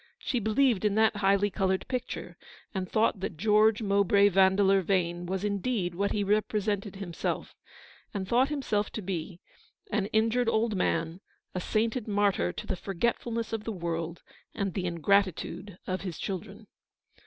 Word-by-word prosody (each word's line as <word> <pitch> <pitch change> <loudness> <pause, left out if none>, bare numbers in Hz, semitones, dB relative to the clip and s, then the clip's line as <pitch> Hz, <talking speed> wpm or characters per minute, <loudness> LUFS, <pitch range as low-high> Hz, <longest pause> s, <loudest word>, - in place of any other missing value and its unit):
She 250 - -1
believed 220 0 +2
in 210 -1 +2
that 220 -1 +3
highly 200 0 +3
coloured 190 -1 0
picture, 255 -1 -4 0.4
and 185 -3 -3
thought 220 -2 +2
that 185 -3 -4
George 215 +3 +4
Mowbray 200 0 +4
Van 190 0 +4
deleur 195 -1 +4
Vane 175 -2 0
was 190 +1 -2
indeed 200 -2 -1
what 200 +3 -1
he 205 - 0
represented 205 -1 0
himself, 190 -4 -4 0.6
and 195 -2 -4
thought 250 +6 +3
himself 235 -8 -1
to 220 - -4
be; 175 -1 -4 0.5
an 195 - 0
injured 225 +3 +2
old 220 -1 +1
man, 165 -1 -1 0.3
a 185 - -2
sainted 225 +4 -1
martyr 205 -3 +2
to - - -7
the 190 - -2
forgetfulness 225 +5 -2
of 220 -1 -2
the 225 - -3
world, 170 -3 -4 0.3
and 195 -3 -2
the 180 -2 -2
ingratitude 185 +1 0
of 185 0 -2
his 180 -4 -5
children. 205 +2 -5
200 Hz, 155 wpm, -29 LUFS, 185-220 Hz, 0.6 s, George